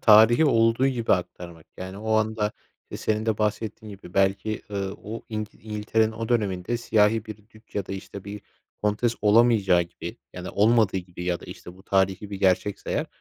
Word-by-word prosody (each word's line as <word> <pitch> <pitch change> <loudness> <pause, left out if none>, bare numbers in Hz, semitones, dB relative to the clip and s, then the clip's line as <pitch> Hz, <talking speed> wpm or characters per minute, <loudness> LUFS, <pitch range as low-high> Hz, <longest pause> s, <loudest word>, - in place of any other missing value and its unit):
tarihi 110 +6 +7
olduğu 115 -1 +3
gibi 120 -4 +1
aktarmak 85 -2 -4
yani 95 +2 -7
o 110 +1 -4
anda, 110 -1 +1 0.4
eee, - - -5
senin 110 0 -1
de 110 -2 0
bahsettiğin 105 0 -2
gibi 90 -2 -14
belki, 100 +2 +1
ııı, 100 -1 -3
o 110 +2 -6
İngi 110 -1 -5
İngiltere'nin 110 +1 0
o 115 0 -5
döneminde 105 -2 0
siyahi 110 -1 +2
bir 110 -2 -7
dük 110 0 -21
ya 100 -2 -2
da, - - -5
işte, 95 0 -8
bir 105 +1 -7 0.4
kontes 105 +3 +1
olamayacağı 105 -4 +5
gibi 85 - -8 0.2
ya 90 - -8
da - - -5
olmadığı 110 -2 +3
gibi 90 -1 -6
ya 90 -1 -1
da, - - -11
işte, 90 - -10
bu 95 - -16
tarihî 95 +1 0
bir 100 - -5
gerçekse 95 +1 +1
eğer. - - 0
105 Hz, 185 wpm, -25 LUFS, 95-110 Hz, 0.4 s, tarihi